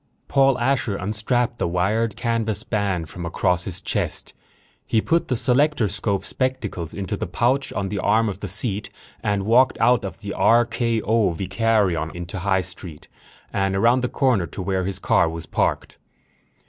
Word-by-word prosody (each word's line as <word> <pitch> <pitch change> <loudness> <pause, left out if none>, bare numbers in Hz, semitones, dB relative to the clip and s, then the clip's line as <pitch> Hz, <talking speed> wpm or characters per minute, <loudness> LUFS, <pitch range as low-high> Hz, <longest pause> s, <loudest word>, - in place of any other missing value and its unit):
Paul 135 -2 +3
Asher 120 -4 0
unstrapped 110 +5 -1
the - - 0
wired 100 +6 0
canvas 115 -3 -1
band 100 -6 -1
from 85 +3 -8
across 90 +1 0
his 90 - -3
chest. - - -2 0.5
He 110 - +2
put 165 +9 +1
the 130 - 0
selectorscope 115 - +1
spectacles 115 - -3
into 100 -2 -4
the - - -4
pouch 125 +9 +1
on 95 -1 -2
the 100 0 -3
arm 110 +4 +2
of 100 - -4
the 100 - -5
seat 105 +2 0 0.3
and 100 -2 -1
walked 125 +4 +4
out 125 0 +4
of 95 +1 -6
the 100 -1 -5
R.K.O. 115 -3 +2
Vicarion 95 -3 +1
into 90 +3 -6
High 95 +1 +1
Street 90 -3 -8 0.4
and 95 0 0
around 120 +6 +3
the 125 - -1
corner 120 -11 +1
to 95 - -6
where 95 -1 -1
his 95 -1 -2
car 90 - +2
was 85 0 -6
parked. - - -1
105 Hz, 160 wpm, -22 LUFS, 95-120 Hz, 0.5 s, walked